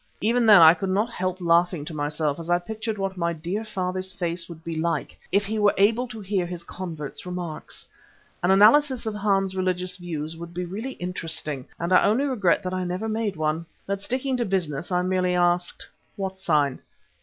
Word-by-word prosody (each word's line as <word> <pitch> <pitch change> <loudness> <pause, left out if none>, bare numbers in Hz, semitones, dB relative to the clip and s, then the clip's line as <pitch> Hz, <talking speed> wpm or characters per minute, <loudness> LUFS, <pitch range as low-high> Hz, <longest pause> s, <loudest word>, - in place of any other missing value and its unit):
Even 230 +2 +2
then 205 -6 +9
I 160 0 +10
could 190 +3 -3
not 210 +5 +1
help 185 -2 -2
laughing 170 -2 +2
to 160 - -6
myself 150 0 -1
as 165 0 -7
I 175 - +4
pictured 220 +4 -4
what 195 -1 -3
my 170 -1 0
dear 175 +7 -3
father's 185 -3 -3
face 170 -1 -3
would 165 -1 -10
be 165 -1 -4
like 160 -1 -1 0.2
if 200 +1 +2
he 215 +2 -2
were 205 -1 +4
able 225 +6 +3
to 230 -2 -8
hear 195 -3 -1
his 175 -1 -6
convert's 165 -5 -6
remarks. 180 -3 -6 0.6
An 175 - +1
analysis 245 +7 +5
of 220 - -2
Hans's 195 -2 +1
religious 185 -1 -1
views 165 -3 -5
would 170 +1 -9
be 180 0 -2
really 215 +9 -5
interesting, 160 -6 -3
and 170 +2 0
I - - +6
only 220 +7 +3
regret 205 -9 +2
that 185 0 -3
I 185 0 -1
never 180 +5 -3
made 220 -2 -1
one. 155 +1 -1 0.2
But 200 0 -3
sticking 255 +4 -1
to 240 - +1
business 175 -4 -2
I 180 0 +2
merely 185 -1 +1
asked: 175 0 +1 0.3
"What 190 -2 -3
sign?" 150 -8 +1
185 Hz, 200 wpm, -25 LUFS, 170-205 Hz, 0.6 s, I